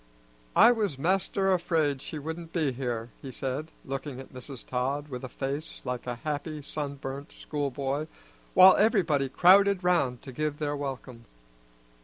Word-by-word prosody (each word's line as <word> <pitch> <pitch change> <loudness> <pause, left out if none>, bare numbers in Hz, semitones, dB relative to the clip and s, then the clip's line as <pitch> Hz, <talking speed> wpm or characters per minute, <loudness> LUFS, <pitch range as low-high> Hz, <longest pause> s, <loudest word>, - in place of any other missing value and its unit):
"I - - +8
was 210 - -1
master 190 +4 +1
afraid 160 -6 +1
she 155 - -5
wouldn't 160 +3 -6
be 155 -6 +1
here," 120 -2 -4
he 135 - -7
said, 135 +5 -4 0.2
looking 135 -1 -5
at 135 - -11
Mrs. 130 0 -7
Todd 135 +4 -2
with 125 -2 -6
a 130 - -5
face 140 +5 -4
like 125 -1 -4
a 125 - -2
happy 150 +2 -4
sunburnt 140 -1 -5
schoolboy, 140 0 -3 0.5
while 185 0 +9
everybody 170 -11 +3
crowded 190 +4 +5
round 165 -9 +1
to 130 - -8
give 150 +2 -2
their 145 -1 -2
welcome. 130 -4 -6
145 Hz, 150 wpm, -28 LUFS, 130-165 Hz, 0.5 s, while